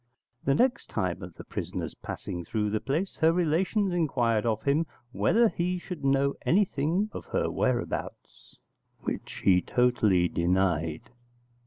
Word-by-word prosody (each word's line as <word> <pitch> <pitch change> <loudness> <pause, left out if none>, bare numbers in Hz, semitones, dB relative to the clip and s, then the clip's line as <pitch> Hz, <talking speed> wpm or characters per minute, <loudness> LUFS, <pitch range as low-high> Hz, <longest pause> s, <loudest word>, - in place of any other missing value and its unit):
The 135 - +2
next 255 - +1
time 90 0 -2
of 90 -3 -9
the - - -9
prisoner's - - -5
passing 90 -1 -6
through 105 +3 -1
the 110 - 0
place, 160 - -2
her 160 +1 +4
relations 180 +4 +1
inquired 120 -10 +1
of 110 -1 0
him 150 +4 +2 0.2
whether 230 - +3
he 180 0 -1
should 180 -2 -7
know 140 0 +2
anything 180 +1 +1
of - - -7
her - - -1
whereabouts; - - -3 0.4
which - - -5
he 90 -2 +5
totally 110 -8 +2
denied. 85 -2 0
135 Hz, 140 wpm, -28 LUFS, -, 0.4 s, he